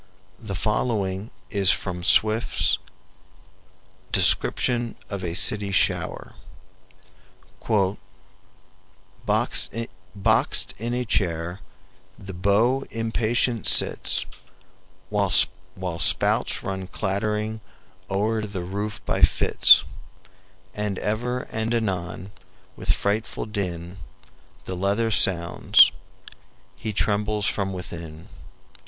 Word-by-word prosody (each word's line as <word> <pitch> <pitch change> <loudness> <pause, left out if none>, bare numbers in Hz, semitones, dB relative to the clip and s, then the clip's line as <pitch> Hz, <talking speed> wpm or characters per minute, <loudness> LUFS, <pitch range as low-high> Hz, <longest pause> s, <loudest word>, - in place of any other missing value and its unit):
The 105 -4 -6
following 105 -2 -1 0.2
is 100 -3 +2
from 90 0 -1
Swift's 110 +4 +3 1.3
"Description 120 -2 +3 0.2
of 100 -2 -5
a 85 -1 -4
City 100 +1 +2
Shower": - - -1 2.9
"Boxed - - +1
in 115 +1 -1
a 125 0 -2
chair 85 -3 -1 0.6
the 95 -1 -9
beau 105 +9 +1
impatient 115 +1 -1
sits, - - +3 0.9
While 100 -2 +1 0.7
spouts - - +1
run 95 -1 -5
clattering 105 +3 -3 0.5
o'er 110 +3 0
the 100 -4 -5
roof 100 +4 -5
by - - -1
fits, - - +5 0.9
And 105 -2 -3
ever 120 +5 -2
and 110 +1 -2
anon 95 -3 -3 0.4
with - - -1
frightful 110 +3 -2
din 90 -4 -5 0.7
The 95 - -4
leather 100 +5 0
sounds; 85 -5 +4 0.8
he 110 - -5
trembles 105 0 0
from 100 -2 -1
within. 85 -3 -8
100 Hz, 85 wpm, -24 LUFS, 95-110 Hz, 2.9 s, fits